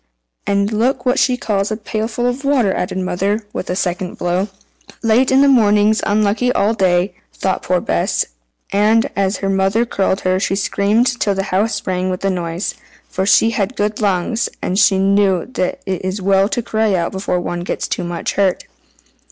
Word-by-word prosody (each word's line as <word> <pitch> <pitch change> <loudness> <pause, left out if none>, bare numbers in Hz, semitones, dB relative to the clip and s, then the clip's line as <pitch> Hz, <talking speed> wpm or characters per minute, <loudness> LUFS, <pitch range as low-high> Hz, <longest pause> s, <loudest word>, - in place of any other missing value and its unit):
"And 200 +1 +1
look 250 +4 0
what 250 +1 +2
she 250 -1 +2
calls 205 -4 -1
a 215 - -2
pailful 220 +2 -3
of 245 +3 -1
water!" 260 -9 +2
added 180 - -3
the 190 - -1
mother, 200 +4 -1
with - - -5
a 180 - -1
second 180 -1 -2
blow. 180 +3 0 0.6
"Late 230 +3 +3
in 265 +1 +5
the - - +5
morning's 215 -4 +4
unlucky 215 +4 +1
all 215 -1 +2
day," 185 -2 +1 0.2
thought 190 - -2
poor 180 0 +1
Bess, - - 0 0.5
and, 215 +3 +3
as 195 0 0
her - - +1
mother 195 +4 +1
curled 195 -3 -1
her, 185 0 +1
she 195 - 0
screamed 215 +5 +1
till 200 -2 +1
the 195 - -1
house 210 +2 0
rang 185 0 -1
with 185 0 -3
the 195 - +1
noise; 175 +1 -3 0.4
for 190 +1 -2
she 225 +2 +5
had 210 +2 -2
good 210 +2 -2
lungs, 205 +3 0
and 180 - -2 0.4
knew 195 -3 +2
that 180 - -2
it 185 -2 -3
is 185 +2 -2
well 195 +1 +2
to 240 -1 -2
cry 220 -3 +1
out 170 -2 -1
before 190 -1 -2
one 175 0 -4
gets 175 - -3
too - - -3
much 175 -1 -3
hurt. 195 -2 0
200 Hz, 190 wpm, -18 LUFS, 185-220 Hz, 0.6 s, in